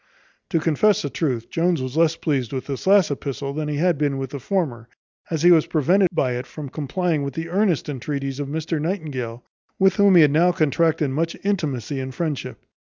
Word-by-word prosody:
To 165 - +1
confess 170 +6 +2
the 145 - -3
truth, 130 -8 -2
Jones 170 -1 +1
was 130 +1 -5
less 165 0 +3
pleased 135 -8 -2
with 130 - -3
this 140 +5 -5
last 195 -5 +5
epistle 140 0 -4
than 155 +1 -3
he 150 - -2
had 170 -1 +1
been 145 -2 0
with 135 -1 -5
the 140 - -5
former, 125 -8 -2 0.4
as 160 -2 -2
he 175 - +7
was 160 -3 +5
prevented 180 +5 +3
by 140 -7 0
it 125 +1 -4
from 150 -3 -8
complying 155 +3 -1
with 140 -2 -4
the 165 +1 -4
earnest 185 -3 +1
entreaties 140 0 -4
of 145 - -3
Mr 155 +1 -3
Nightingale, 140 - -4 0.3
with 190 0 +3
whom 200 -2 +5
he 170 - +8
had 145 - +4
now 170 +4 +4
contracted 155 -2 +1
much 165 +4 -2
intimacy 145 - -2
and 130 0 -6
friendship. 155 -5 -4
150 Hz, 205 wpm, -22 LUFS, 135-170 Hz, 0.4 s, he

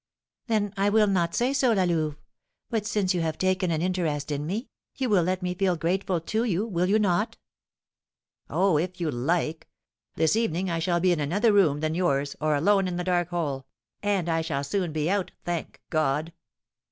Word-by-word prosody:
"Then 210 -3 0
I 200 +1 +3
will 215 +1 +4
not 175 -4 +1
say 250 +3 +1
so, 265 -4 +3
La 195 -3 +2
Louve; 160 -4 0 0.5
but 220 -2 -1
since 200 -3 +1
you 175 - 0
have 160 -1 -2
taken 185 -1 +1
an 160 0 0
interest 160 -6 -1
in 145 +1 -2
me, 215 +8 -3 0.3
you 260 -2 -1
will 200 -4 +4
let 185 +2 -1
me 180 0 -1
feel 185 -1 +1
grateful 175 +2 0
to 220 +7 -1
you, 205 -3 0
will 180 -5 0
you 205 +3 +4
not?" 205 0 +1 1.1
"Oh, 185 -5 +2
if 180 +2 -3
you 165 -3 -1
like! 155 +5 -1 0.5
This 160 +4 +2
evening, 190 -5 0
I 165 - -1
shall 175 +1 +1
be 180 +1 +3
in 170 - +1
another 205 +10 +2
room 155 -8 +3
than 155 0 0
yours, 145 -5 0
or 155 0 +2
alone 195 +6 +3
in 175 -1 -3
the 180 - -2
dark 175 -1 +1
hole, 145 -6 -3 0.3
and 200 -4 0
I 165 -1 +1
shall 155 -4 -2
soon 175 +4 -1
be 155 0 -1
out, 195 0 0
thank 175 -2 -4
God!" 155 +1 0
175 Hz, 200 wpm, -26 LUFS, 160-195 Hz, 1.1 s, will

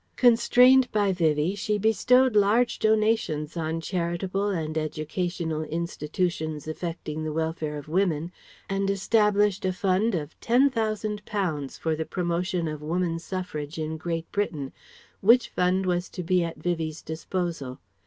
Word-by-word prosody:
Constrained 250 +2 +5
by 205 -2 +2
Vivie 160 -1 +1
she 210 +1 -1
bestowed 250 +4 +3
large 215 +4 +3
donations 215 -9 +1
on 160 0 -2
charitable 180 +3 -2
and 160 -6 -2
educational 160 +1 -2
institutions 160 -1 -3
affecting 155 -1 -4
the 155 - -2
welfare 160 -1 -2
of 145 - -9
women 170 -1 0 0.4
and 195 0 -1
established 205 0 +2
a 185 - +1
fund 190 +3 +1
of 150 -2 -5
Ten 255 +4 +3
thousand 215 -3 -2
pounds 160 -10 -2
for 160 -1 -1
the 160 - -2
promotion 175 0 -1
of 155 -1 -5
Woman 165 +2 -1
Suffrage 165 -4 -5
in 155 0 -3
Great 165 0 -3
Britain, 155 -10 -2 0.5
which 235 +5 +5
fund 180 +1 +1
was 180 0 0
to 180 - -6
be 180 +1 +2
at 165 -2 -5
Vivie's 160 -1 -3
disposal. 160 -4 -4
175 Hz, 140 wpm, -26 LUFS, 160-205 Hz, 0.5 s, Constrained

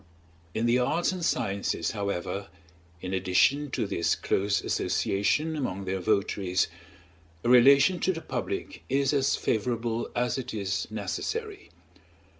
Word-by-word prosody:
In 110 - 0
the 120 +1 +3
arts 160 +9 +1
and 185 -2 -5
sciences, 100 - 0
however, 100 -1 -3 0.6
in 95 +1 -4
addition 95 +10 +2
to 120 -3 -1
this 85 -4 0
close 100 +1 0
association 150 +11 0
among 100 -10 -3
their 95 0 -2
votaries, 95 -2 +1 0.8
a - - 0
relation 140 +8 +6
to 190 - +2
the 165 - -4
public - - -4
is 135 +1 +2
as 140 -1 +2
favorable 115 0 -1
as 120 +2 0
it 125 - -5
is 95 -4 -2
necessary. 395 - -4
115 Hz, 130 wpm, -28 LUFS, 100-140 Hz, 0.8 s, relation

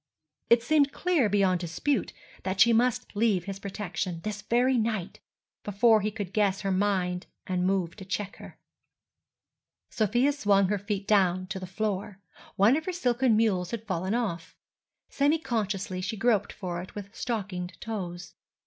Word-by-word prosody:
It 235 0 +5
seemed 285 +1 +3
clear 340 - +1
beyond 190 -3 +2
dispute 180 - -1 0.3
that 190 0 -3
she 230 +3 +7
must 240 -1 +1
leave 205 -4 +2
his 195 +1 -6
protection, 185 -3 -4
this 210 -1 -4
very 245 +5 +2
night, 215 -5 -1 0.4
before 215 +2 +4
he 210 - 0
could 205 -3 -6
guess 200 -2 +1
her 195 - -1
mind 185 -2 0 0.2
and 180 -1 0
move 185 -3 0
to 195 - -8
check 200 +1 -4
her. - - -12 1.3
Sofia 240 +6 +2
swung 200 -8 +2
her 205 -1 0
feet 200 -1 -3
down 185 -3 +3
to 200 -2 -4
the 185 - -7
floor. 200 0 -3 0.4
One 210 +7 +5
of 315 +1 -2
her 370 - -1
silken 250 -8 +2
mules 190 -6 +1
had 225 +1 -5
fallen 190 +1 -1
off. 200 -9 -3 0.5
Semi 290 +3 +2
consciously 210 - -2
she 215 +4 -3
groped 220 -1 +2
for 180 -3 -5
it 185 - -11
with 200 0 -8
stockinged 185 -7 -4
toes. 175 -6 -6
205 Hz, 160 wpm, -28 LUFS, 185-230 Hz, 1.3 s, she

